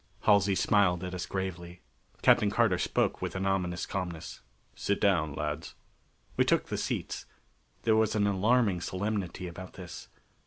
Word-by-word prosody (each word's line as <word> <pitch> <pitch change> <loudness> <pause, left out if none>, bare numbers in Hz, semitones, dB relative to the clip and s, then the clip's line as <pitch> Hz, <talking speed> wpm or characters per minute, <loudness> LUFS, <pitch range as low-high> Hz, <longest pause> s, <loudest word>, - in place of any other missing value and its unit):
Halsey 100 -2 +4
smiled 95 -4 +3
at 90 0 -4
us 90 -1 -4
gravely. 90 -2 -5 0.4
Captain 105 - +5
Carter 100 -4 +2
spoke - - 0
with - - -3
an 95 +1 -2
ominous 90 -3 0
calmness: 90 -4 -5 0.3
"Sit 100 - -1
down, 80 -8 +2
lads." 75 +1 -4 0.6
We - - +5
took - - +1
the - - -2
seats. - - -3 0.6
There 110 -1 +4
was 110 0 +2
an 105 -1 +2
alarming 100 -1 +2
solemnity 95 -1 -3
about 90 +2 -9
this. 90 -1 -9
95 Hz, 150 wpm, -30 LUFS, 90-100 Hz, 0.6 s, Captain